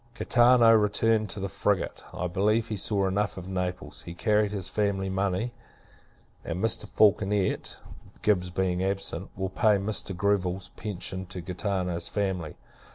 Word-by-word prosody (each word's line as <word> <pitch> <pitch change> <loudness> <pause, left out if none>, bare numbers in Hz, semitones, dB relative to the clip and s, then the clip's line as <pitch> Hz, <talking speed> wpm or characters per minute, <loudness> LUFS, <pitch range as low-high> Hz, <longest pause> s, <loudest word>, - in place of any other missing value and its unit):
Gaetano 120 -1 +5
returned 110 0 +2
in 100 - -6
the - - 0
frigate. 100 0 -1
I 90 - -4
believe, 105 +5 +1
he 110 - -2
saw 100 0 +1
enough 100 +2 -1
of 90 0 -7
Naples. 90 -1 -4
He 85 - -9
carried 105 +1 +2
his 100 -3 -3
family 100 -2 -1
money; 95 +4 -1 0.9
and 85 - -4
Mr. 110 +2 +1
Falconet 100 -2 +2 0.5
(Gibbs 90 -4 +2
being 90 0 0
absent) 95 -2 -3
will 95 0 -2
pay 105 +2 +3
Mr. 100 -2 -2
Greville's 95 -1 0
pension 95 -2 -5
to 90 0 -6
Gaetano's 90 -1 -2
family. 95 -6 -2
95 Hz, 145 wpm, -27 LUFS, 90-105 Hz, 0.9 s, Gaetano